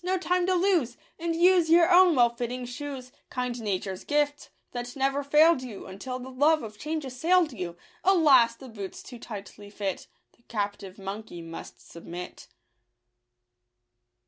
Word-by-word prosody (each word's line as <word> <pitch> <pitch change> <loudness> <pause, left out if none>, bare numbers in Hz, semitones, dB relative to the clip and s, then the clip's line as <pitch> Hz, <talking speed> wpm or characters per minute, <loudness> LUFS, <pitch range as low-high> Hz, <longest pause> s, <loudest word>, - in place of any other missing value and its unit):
— - - -36
no 370 +1 +1
time 360 0 0
to 375 - +3
lose— 345 -10 +1 0.2
And 335 0 -1
use 350 -1 +4
your 340 +2 +6
own 360 -2 +7
well 240 -2 +5
fitting 245 +1 -4
shoes, 255 0 -7
— - - -46
Kind 250 -1 -3
nature's 190 -2 -3
gift, 290 0 0 0.2
that 245 0 -6
never 275 +1 0
fail'd 300 +1 +5
you 235 -6 -8
Until 225 +7 -6
the 255 +1 -9
love 295 +3 +3
of 210 -1 -9
change 310 -1 -3
assail'd 320 +5 +2
you. 175 -5 -6 0.3
Alas! 285 -11 +5
the 265 - -12
boots 205 -5 -8
too 245 -2 -10
tightly 205 -2 -9
fit; 200 -2 -4 0.3
The - - -31
captive 205 -3 -4
monkey 195 -3 -7
must 165 0 -10
submit. 175 +1 -9
255 Hz, 160 wpm, -27 LUFS, 210-320 Hz, 0.3 s, own